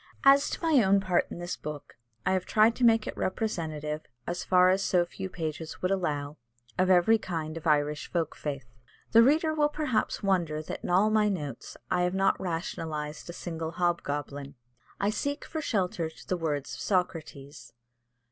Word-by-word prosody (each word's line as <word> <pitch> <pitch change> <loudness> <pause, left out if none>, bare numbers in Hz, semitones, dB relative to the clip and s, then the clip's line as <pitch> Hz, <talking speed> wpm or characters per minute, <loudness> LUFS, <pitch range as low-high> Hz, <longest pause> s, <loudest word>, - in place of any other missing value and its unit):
As 275 0 +6
to - - -5
my 305 -7 +5
own 195 0 +4
part 185 -2 +1
in - - -7
this 175 0 -4
book, 150 -1 -8 0.3
I - - +2
have 185 -1 +1
tried 220 +2 +4
to 255 - -2
make 225 -2 +5
it - - -5
representative, 155 -7 -2 0.2
as 175 0 -3
far 185 0 +5
as 190 +1 +1
so 180 -2 +2
few 190 +2 -6
pages 160 -2 -5
would 185 - +1
allow, 150 -6 -1 0.4
of 185 0 +2
every 190 +5 +5
kind 160 -5 -4
of 165 0 -5
Irish 150 -1 +1
folk 165 -3 -1
faith. 140 -4 -5 0.5
The 230 - +8
reader 310 +6 +4
will 300 -1 +2
perhaps 280 -9 -1
wonder 170 -6 +1
that - - -6
in - - -4
all 195 +5 +4
my 215 -1 +3
notes 145 - -5
I 180 - +2
have 180 +1 0
not 195 0 +2
rationalised 160 -3 -4
a - - -5
single 165 -2 -5
hobgoblin. 145 -5 -2 0.4
I 200 +1 +1
seek 285 +6 -3
for 315 - -4
shelter 185 - -1
to 160 - -16
the 185 - 0
words 150 -5 -2
of - - -7
Socrates. 160 -7 -3
175 Hz, 185 wpm, -28 LUFS, 155-205 Hz, 0.5 s, The